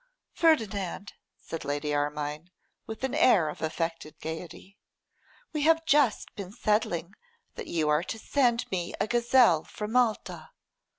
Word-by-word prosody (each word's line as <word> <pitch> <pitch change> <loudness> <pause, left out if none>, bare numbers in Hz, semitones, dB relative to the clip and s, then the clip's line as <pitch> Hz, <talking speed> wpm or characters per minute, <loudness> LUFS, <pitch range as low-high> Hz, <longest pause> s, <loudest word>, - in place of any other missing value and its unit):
'Ferdinand,' 210 - +1 0.3
said 165 - -7
Lady 145 +1 -2
Armine, 150 +2 -2 0.4
with 220 +3 -7
an 265 0 -1
air 210 - +4
of - - -8
affected 165 -1 -3
gaiety, 165 +4 -8 0.7
'we 305 - -1
have 325 +2 +3
just 285 -7 +2
been 195 -2 -7
settling 205 -5 -1 0.4
that 460 -5 -7
you 160 - 0
are 150 +1 +3
to 190 - -5
send 240 0 +1
me 175 -2 -2
a - - +2
gazelle 235 -6 +4
from 210 0 -6
Malta. 240 -3 0
200 Hz, 135 wpm, -28 LUFS, 160-245 Hz, 0.7 s, air